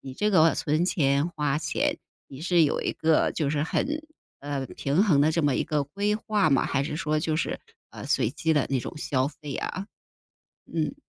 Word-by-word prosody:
你 135 - -8
这 210 +10 0
个 165 -5 +5
存 155 +3 +1
钱、 145 -4 +2
花 150 -3 -1
钱， 155 - -1 0.3
你 135 +1 -11
是 170 -1 +3
有 - - 0
一 - - -1
个， 160 0 +2
就 150 -4 -1
是 145 0 0
很 300 - -1 0.4
呃， 140 -1 -3
平 140 +6 -1
衡 150 -9 +4
的 155 +2 +4
这 160 -1 0
么 140 -3 +3
一 - - +1
个 150 -2 -1
规 200 +8 -1
划 210 -5 +1
吗？ 135 - +3
还 140 - 0
是 150 +1 -3
说 155 -1 0
就 155 -1 0
是， - - -2 0.3
呃， - - -9
随 - - +1
机 160 +3 0
的 145 -3 +2
那 135 -2 0
种 - - -6
消 135 -2 0
费 150 -2 -8
啊？ 195 +2 -4 0.9
嗯。 165 - -1
155 Hz, 220 characters per minute, -26 LUFS, 140-170 Hz, 0.9 s, 个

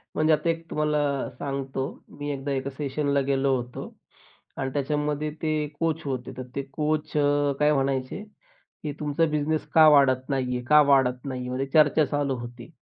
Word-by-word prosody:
म्हणजे 155 0 +3
आता 155 +2 +1
एक 165 0 -3
तुम्हाला 150 0 0 0.4
सांगतो. 135 -1 -3 0.3
मी 145 0 -6
एकदा 140 0 -4
एका 135 0 -2
सेशनला 140 0 -1
गेलो 135 -1 +2
होतो 125 -1 -5 0.7
आणि 135 0 -2
त्याच्यामध्ये 150 +1 -1
ते 155 -1 0
कोच 165 -1 0
होते 130 -2 -4
तर 130 - -4
ते 140 - -1
कोच 150 +1 -1
अ, 145 -1 +2
काय 150 0 +4
म्हणायचे 135 +5 -1
की, - - -12
"तुमचा 150 +2 +1
बिझनेस 150 +1 0
का 160 -1 +8
वाढत 135 -3 +5
नाही 130 -2 -1
आहे? 125 - -3
का 150 +3 +7
वाढत 125 -2 +3
नाही 130 -2 -4
आहे?" 125 - -5
म्हणजे 130 +2 -2
चर्चा 155 0 +5
चालू 145 -2 -1
होती. 120 +1 -9
145 Hz, 175 wpm, -26 LUFS, 135-150 Hz, 0.7 s, का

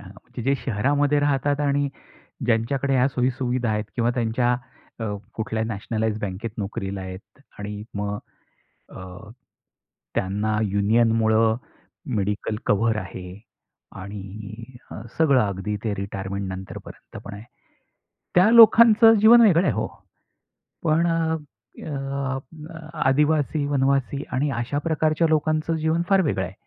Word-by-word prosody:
हां. 95 -2 -12 0.2
की 120 - -5
जे 135 +3 +2
शहरामध्ये 145 +5 +1
राहतात. 145 0 +1
आणि 145 0 +1 0.6
ज्यांच्याकडे 125 +4 +1
ह्या 130 0 +4
सोयी-सुविधा 125 -2 -1
आहेत. 105 0 -1
किंवा 120 -1 +1
त्यांच्या 120 +1 +1 0.4
अ, - - -4 0.3
कुठल्या 110 0 -2
नॅशनलाईज्ड 110 0 -2
बँकेत 100 +4 -4
नोकरीला 100 -1 -4
आहेत. 95 +7 -10 0.2
आणि 105 0 -6
मग 105 0 -2 0.7
अ, 95 +3 -11 0.8
त्यांना 105 +3 -1
युनियनमुळं 110 +2 +2 0.6
मेडिकल 105 +2 -2
कव्हर 110 +2 +2
आहे. 95 -1 -9 0.6
आणि 105 +5 -9
अ, - - -7 0.2
सगळं 140 -5 +4
अगदी 100 0 -3
ते 105 - -1
रिटायरमेंट 100 0 -4
नंतरपर्यंत 95 0 -9
पण - - -8
आहे. 105 - -10 0.9
त्या 185 +5 +6
लोकांचं 225 0 +8
जीवन 235 +3 +8
वेगळं 185 -4 +5
आहे - - +2
हो. - - -2 1.0
पण 165 +1 +2
अ, 165 -1 +1 0.5
अ, 135 -2 -3 0.7
आदिवासी, 150 +1 +2
वनवासी 140 0 0
आणि 140 +3 0
अशा 130 +4 -3
प्रकारच्या 155 +1 +1
लोकांचं 155 +1 +1
जीवन 160 +2 0
फार 195 -1 +5
वेगळं 95 - -1
आहे. 90 - -9
120 Hz, 120 wpm, -23 LUFS, 105-145 Hz, 1.0 s, लोकांचं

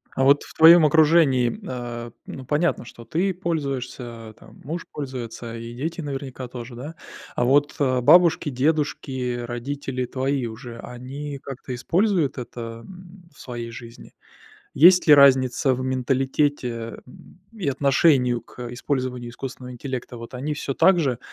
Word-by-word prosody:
А 135 - +1
вот 140 +2 +5
в - - -13
твоем 165 0 +8
окружении, 150 - +4
э, 120 -2 -6
ну, 130 - -8
понятно, 155 +6 0
что 115 0 -12
ты 185 +8 0
пользуешься, 140 -8 -3 0.2
а, - - -13
там, - - -18
муж 165 +4 -5
пользуется 120 -4 -6
и 115 0 -7
дети, 165 +7 -4
наверняка, 135 -3 -6
тоже, 120 0 -9
да. 145 +7 -8 0.4
А 120 - +1
вот, 145 +3 +3
э, 130 -3 +1
бабушки, 170 +3 +5
дедушки, 130 -3 -1
родители 130 +2 -4
твои 130 0 -2
уже, 115 +1 -9
они 135 +4 -7
как-то 130 -1 -7
используют 170 - +1
это, 115 -1 -7
м, 180 -1 -14
в - - -19
своей 120 -2 -6
жизни? 115 +1 -12 0.6
Есть 180 +4 +7
ли 150 - +9
разница 130 -1 +5
в 125 - -5
менталитете, 130 -2 -1
э, - - -15 0.4
и 205 -9 -4
отношении 135 -2 +3
к 120 0 -9
использованию 125 -2 -3
искусственного 125 0 -8
интеллекта? 125 0 -6
Вот 115 +2 -10
они 140 +4 -3
всё 140 -1 -4
так 185 +3 +4
же 130 -6 0
130 Hz, 150 wpm, -23 LUFS, 125-150 Hz, 0.6 s, ли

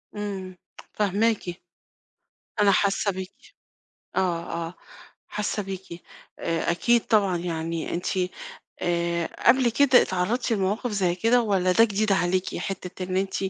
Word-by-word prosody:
إمم 195 -3 -5 0.4
فاهماكِ. 205 -3 0 1.0
أنا 205 -1 +5
حاسة 200 +1 +2
بيكِ، 190 - -9 0.6
آه، 175 -3 +1 0.3
آه، 175 - -12 0.5
حاسة 210 0 -2
بيكِ، 190 -3 -8 0.4
آآ، 165 0 -1
أكيد 235 +7 +2
طبعًا 200 -5 +3
يعني 165 -1 -3
أنتِ 175 - -3 0.7
آآ، 170 -1 0 0.2
قبل 245 0 +5
كده 255 +1 +5
اتعرضتِ 190 +8 -1
لمواقف 210 +4 0
زي 190 -4 +1
كده 230 +6 +3
والّا 190 -4 +2
ده 225 +5 +6
جديد 210 -1 +1
عليكِ 185 0 0
حتة 185 -1 -5
إن 185 0 -3
أنتِ 190 0 -1
190 Hz, 125 wpm, -25 LUFS, 180-210 Hz, 1.0 s, ده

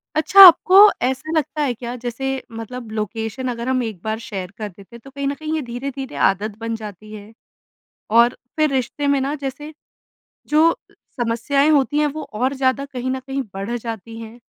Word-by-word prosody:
अच्छा, 315 +6 +3
आपको 350 +2 +5 0.3
ऐसा 265 +5 -2
लगता 300 +1 -2
है 265 -4 0
क्या? 240 +1 -7
जैसे 260 +2 -4 0.2
मतलब 225 0 -8
लोकेशन 220 +3 -4
अगर 235 0 -6
हम 255 -1 +1
एक 215 -6 -6
बार 220 0 -3
शेयर 190 -4 -6
कर 210 -2 -5
देते 200 +5 -16
हैं, - - -11
तो 275 - -12
कहीं 280 0 -4
न 280 - 0
कहीं 310 +2 -5
ये 315 - -1
धीरे-धीरे 265 +2 -6
आदत 205 +2 0
बन 230 0 -3
जाती 215 -1 -10
है 215 +1 -11 0.9
और 240 +1 +5 0.2
फिर 305 -2 +2
रिश्ते 270 +3 -2
में 280 -1 +2
ना 275 +3 -2
जैसे, 290 +2 -6 0.7
जो 315 +2 +3 0.2
समस्याएँ 240 +5 -1
होती 290 0 +2
हैं, 300 - +3
वो 300 +2 -4
और 255 +6 -1
ज़्यादा 265 +1 0
कहीं 260 -2 -5
न 260 0 -2
कहीं 270 +1 -4
बढ़ 195 +5 -4
जाती 225 -1 -7
हैं? 225 +2 -11
255 Hz, 190 wpm, -20 LUFS, 225-280 Hz, 0.9 s, आपको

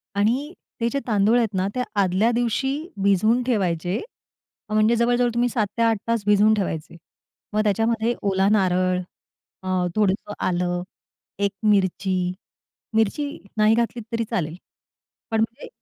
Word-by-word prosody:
आणि 250 - +1 0.3
ते 235 - +2
जे 280 - +1
तांदूळ 215 +1 +3
आहेत 225 -4 +1
ना, 190 +1 0
ते 250 - 0 0.2
आदल्या 195 +4 +3
दिवशी 240 +3 0 0.3
भिजवून 215 +5 +3
ठेवायचे. 185 -6 0 0.7
म्हणजे 215 +2 +3
जवळ-जवळ 240 +1 +2
तुम्ही 240 +1 +1
7-8 225 0 +1
तास 230 -2 0
भिजवून 210 +1 +5
ठेवायचे. 170 -6 -3 0.6
मग 215 - +2
त्याच्यामध्ये 225 +2 +1
ओला 195 -1 +2
नारळ 185 -3 +2 0.6
अ, 185 -1 0
थोडंसं 205 0 0
आलं 175 0 0 0.6
एक 200 - 0 0.2
मिरची. 190 -1 +1 0.8
मिरची 225 +7 +1 0.3
नाही 215 +1 +5
घातलीत 235 0 -1
तरी 230 0 0
चालेल. 160 -1 -2 0.8
पण 225 - +1
म्हणजे 230 +1 -3
215 Hz, 130 wpm, -23 LUFS, 190-230 Hz, 0.8 s, भिजवून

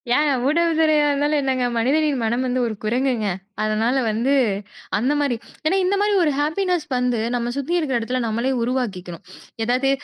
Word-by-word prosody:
ஏங்க, 295 0 +3 0.2
ஊடக 335 +3 +2
துறையா 310 -2 +4
இருந்தாலும் 290 +1 +1
என்னங்க! 260 -2 0
மனிதரின் 285 +4 +2
மனம் 240 +3 0
வந்து 255 0 0
ஒரு 220 - -3
குரங்குங்க. 240 -1 0 0.4
அதனால 220 +4 +1
வந்து 230 +6 +1 0.6
அந்த 255 +7 +1
மாரி 280 -5 +1 0.3
ஏன்னா 375 +5 +2
இந்த 375 +2 +2
மாரி 415 0 +2
ஒரு 300 - +2
ஹேப்பினஸ் 340 +2 0
வந்து 250 -2 0 0.2
நம்ம 240 0 -1
சுத்தி 285 +5 -2
இருக்கிற 270 -6 0
இடத்துல 250 +3 -2
நம்மளே 235 +4 -1
உருவாக்கிக்கணும். 200 -8 -3 0.4
ஏதாவது 255 +3 +1
260 Hz, 160 wpm, -21 LUFS, 235-300 Hz, 0.6 s, துறையா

